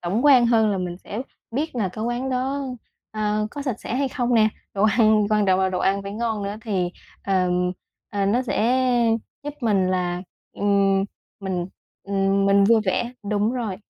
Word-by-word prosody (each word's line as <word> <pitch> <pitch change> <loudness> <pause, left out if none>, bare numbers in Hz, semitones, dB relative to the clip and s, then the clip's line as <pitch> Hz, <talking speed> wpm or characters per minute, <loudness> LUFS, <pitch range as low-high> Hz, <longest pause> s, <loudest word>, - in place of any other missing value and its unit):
tổng 195 +10 -1
quan 260 -5 +7
hơn 225 -2 +3
là 195 - -1
mình 180 -1 -4
sẽ 215 +5 -6 0.3
biết 280 +5 -2
là 210 -5 0
cái 215 +4 -5
quán 240 +3 -2
đó, 265 +2 -1 0.5
a, 215 -1 -1
có 285 - -6
sạch 260 -6 -3
sẽ - - -4
hay 270 +1 0
không 245 -1 -1
nè? 220 -1 +5 0.3
Đồ 195 - 0
ăn 215 -1 +4
quan 210 -1 +3
trọng 190 0 +3
là 190 - +2
đồ 185 -1 -2
ăn 195 +1 +1
phải 200 0 -6
ngon 225 -1 -2
nữa 200 +1 -4
thì, 190 -6 -1 0.3
ờ, 185 -2 +1 0.6
ờ, 200 -1 0
nó 235 +6 +2
sẽ 255 +1 +1 0.6
giúp 295 0 -5
mình 205 -6 +2
là, 180 -1 -1 0.3
ừm, 195 -1 +2 0.4
mình, 185 -3 -2 0.4
ừm, 195 0 +1
mình 200 0 +5
vui 225 +2 +5
vẻ 235 +6 -1 0.2
đúng 210 +2 +1
rồi. 230 -7 -3
210 Hz, 190 wpm, -23 LUFS, 195-240 Hz, 0.6 s, quan